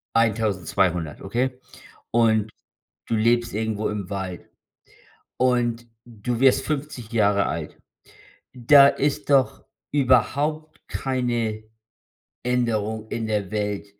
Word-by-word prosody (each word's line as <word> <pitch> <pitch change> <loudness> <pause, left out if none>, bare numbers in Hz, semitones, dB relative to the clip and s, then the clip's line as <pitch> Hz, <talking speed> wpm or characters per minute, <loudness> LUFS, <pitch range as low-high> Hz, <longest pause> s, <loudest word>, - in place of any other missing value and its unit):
1200 95 -7 0
okay? 125 +5 -2 0.5
Und 110 -2 +2 0.6
du 115 - 0
lebst 120 +1 +2
irgendwo 110 0 -2
im 100 -3 -5
Wald. 95 -3 -5 0.9
Und 120 -2 +1 0.2
du 120 +1 -4
wirst 135 -1 +5
50 140 -6 -4
Jahre 100 -3 +2
alt. 80 -2 -5 0.8
Da 140 +3 +7
ist 145 +1 -1
doch 135 -2 +2 0.3
überhaupt 145 +3 +1
keine 120 -5 -2 0.8
Änderung 110 -3 -1
in 115 -1 -3
der 105 -3 -2
Welt 105 -1 -2
115 Hz, 100 wpm, -23 LUFS, 105-125 Hz, 0.9 s, Da